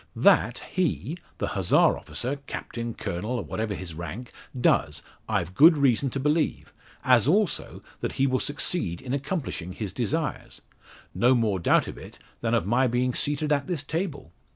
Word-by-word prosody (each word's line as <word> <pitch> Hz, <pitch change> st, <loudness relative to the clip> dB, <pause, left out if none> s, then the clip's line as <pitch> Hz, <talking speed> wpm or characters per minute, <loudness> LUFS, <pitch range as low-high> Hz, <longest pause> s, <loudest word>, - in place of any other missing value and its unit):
That -, -, +3 dB
he, 175 Hz, -2 st, -1 dB, 0.2 s
the -, -, -2 dB
Hussar -, -, +3 dB
officer, 130 Hz, +4 st, -4 dB
captain, 115 Hz, -1 st, -5 dB
colonel, 90 Hz, +8 st, -4 dB
or -, -, -3 dB
whatever 110 Hz, -2 st, -3 dB
his 90 Hz, -3 st, -7 dB
rank, 85 Hz, +9 st, -7 dB, 0.3 s
does, -, -, +2 dB, 0.3 s
I've 85 Hz, +1 st, -1 dB
good 160 Hz, -, +7 dB
reason 135 Hz, -1 st, +2 dB
to 135 Hz, -, -3 dB
believe, 150 Hz, +3 st, 0 dB, 0.3 s
as 125 Hz, -2 st, +4 dB
also 195 Hz, +2 st, +1 dB, 0.2 s
that -, -, -3 dB
he 135 Hz, -, +1 dB
will 130 Hz, -1 st, +1 dB
succeed 145 Hz, -, -1 dB
in 130 Hz, -1 st, -5 dB
accomplishing 135 Hz, -, -3 dB
his 100 Hz, -3 st, -5 dB
desires; 135 Hz, +4 st, -3 dB, 0.5 s
no 125 Hz, +2 st, +4 dB
more 110 Hz, -5 st, +1 dB
doubt 85 Hz, -, +3 dB
of -, -, -7 dB
it -, -, -11 dB, 0.2 s
than 115 Hz, 0 st, +1 dB
of 115 Hz, -, +1 dB
my 120 Hz, +5 st, +3 dB
being 125 Hz, +1 st, 0 dB
seated 150 Hz, +3 st, 0 dB
at 140 Hz, -1 st, -1 dB
this 170 Hz, -6 st, -2 dB
table. 160 Hz, -, -4 dB
125 Hz, 165 wpm, -26 LUFS, 110-150 Hz, 0.5 s, good